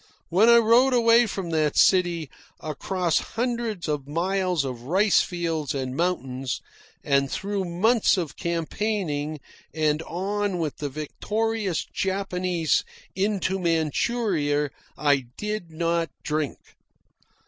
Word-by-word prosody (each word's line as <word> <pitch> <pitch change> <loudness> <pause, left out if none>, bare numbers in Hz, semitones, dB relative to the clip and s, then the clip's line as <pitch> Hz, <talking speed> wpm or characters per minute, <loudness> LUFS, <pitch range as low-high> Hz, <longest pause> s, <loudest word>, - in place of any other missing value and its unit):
When 195 +7 +5
I 235 - +8
rode 235 +3 +5
away 235 0 +5
from 190 -4 -4
that 155 -2 +1
city, 175 -5 +3 0.3
across 170 +3 -1
hundreds 235 -6 -3
of 145 -3 -2
miles 180 0 0
of 125 -3 -5
rice 190 - +3
fields 165 -5 -2
and 130 -1 -3
mountains, 135 -7 -1 0.4
and 140 -1 +2
through 200 -1 -2
months 205 +6 +3
of 165 -6 -3
campaigning, 170 -3 -2 0.4
and 155 -1 +1
on 200 +2 -1
with 160 -4 -3
the 145 - -3
victorious 205 +6 -2
Japanese 185 -4 0 0.3
into 195 -1 0
Manchuria, 160 - 0 0.3
I 145 -3 +2
did 210 -4 -4
not 165 +1 0
drink. 150 -2 -1
175 Hz, 115 wpm, -25 LUFS, 150-205 Hz, 0.4 s, I